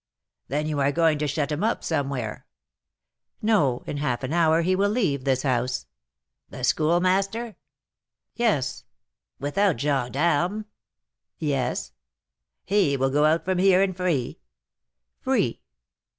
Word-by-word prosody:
"Then 150 +3 -1
you 155 -2 -2
are 140 0 +2
going 160 -1 +2
to 150 - 0
shut 145 +1 -1
him 150 +6 -2
up 225 +2 0
somewhere?" 135 -8 -3 0.9
"No; 170 - +2
in 145 - -4
half 130 -4 -2
an 130 +4 -3
hour 165 -1 +3
he 185 +2 +2
will 200 +2 +2
leave 170 - 0
this 130 -2 +1
house." 125 - -1 0.6
"The - - -9
Schoolmaster?" 190 +8 +1 0.8
"Yes." 220 - 0 0.6
"Without 180 +5 +1
gens 140 -4 0
d'armes?" 170 +9 0 0.7
"Yes." 135 - -2 0.7
"He 185 -8 +2
will 135 0 +1
go 150 +2 +3
out 160 +2 +2
from 185 -1 0
here, 190 0 +5
and 190 -2 -1
free?" 175 -9 -1 0.8
"Free." - - 0
155 Hz, 130 wpm, -25 LUFS, 140-185 Hz, 0.9 s, here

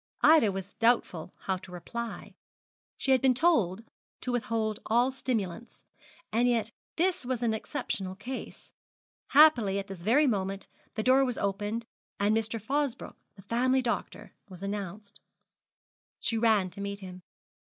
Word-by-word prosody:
Ida 310 -10 +6
was 195 +1 -6
doubtful 225 -8 +1
how 190 -1 -1
to 185 0 -13
reply. 235 +6 -6 0.6
She 270 - 0
had 260 -2 +5
been 260 -2 +4
told 230 - +2 0.4
to 250 - -2
withhold 220 -3 -1
all 240 +4 +3
stimulants, 230 -5 -4 0.5
and 235 +3 +3
yet 230 -2 +1 0.2
this 355 -2 +1
was 250 -1 -2
an 225 -2 +2
exceptional 195 -3 -3
case. 250 +7 -8 0.5
Happily 270 -10 +6
at 200 - -2
this 195 -3 -9
very 245 - +4
moment 195 -5 -1 0.3
the 220 - -1
door 260 +3 +5
was 250 -3 -1
opened, 205 +3 -2 0.3
and 205 +2 +3
Mr. 225 +1 -1
Fosbroke, 275 +3 -2 0.2
the 195 - -14
family 255 +4 +1
doctor, 240 - -3 0.2
was 185 0 -10
announced. 200 +1 -5 1.0
She 230 - -1
ran 220 -5 +3
to 200 +3 -8
meet 200 0 -4
him. 185 -1 -9
225 Hz, 145 wpm, -29 LUFS, 195-250 Hz, 1.0 s, Ida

